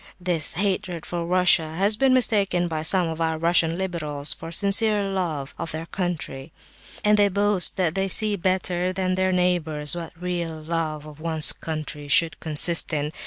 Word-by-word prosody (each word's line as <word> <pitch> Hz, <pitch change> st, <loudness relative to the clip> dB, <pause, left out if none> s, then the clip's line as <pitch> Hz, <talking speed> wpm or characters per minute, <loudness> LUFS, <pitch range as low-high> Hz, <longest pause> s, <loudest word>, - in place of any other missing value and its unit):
This 175 Hz, -4 st, -1 dB
hatred 185 Hz, -2 st, -2 dB
for 170 Hz, -1 st, -4 dB
Russia 175 Hz, -3 st, +3 dB
has 200 Hz, +4 st, +2 dB
been 265 Hz, +4 st, +2 dB
mistaken 200 Hz, -8 st, +1 dB
by 160 Hz, -2 st, -4 dB
some 175 Hz, +2 st, +2 dB
of 160 Hz, 0 st, -5 dB
our 160 Hz, -1 st, -1 dB
'Russian 165 Hz, 0 st, +3 dB
liberals' 155 Hz, -6 st, -3 dB
for 165 Hz, -, -9 dB
sincere 205 Hz, +3 st, +2 dB
love 175 Hz, -8 st, -4 dB
of 165 Hz, -, -4 dB
their 160 Hz, +1 st, -6 dB
country, 165 Hz, -6 st, -5 dB, 0.5 s
and 210 Hz, 0 st, +3 dB
they 205 Hz, -, +5 dB
boast 200 Hz, -1 st, +1 dB
that 175 Hz, -4 st, 0 dB
they 195 Hz, +1 st, -1 dB
see 210 Hz, +2 st, +3 dB
better 185 Hz, -1 st, -1 dB
than 185 Hz, 0 st, -2 dB
their 185 Hz, 0 st, 0 dB
neighbours 175 Hz, -5 st, 0 dB
what 165 Hz, -1 st, -8 dB
real 175 Hz, -3 st, -4 dB
love 155 Hz, -1 st, -4 dB
of 150 Hz, -1 st, -13 dB
one's 160 Hz, -3 st, +3 dB
country 155 Hz, -2 st, -7 dB
should 160 Hz, +3 st, +4 dB
consist 165 Hz, +3 st, +3 dB
in. 150 Hz, -1 st, -2 dB
175 Hz, 170 wpm, -23 LUFS, 160-190 Hz, 0.5 s, they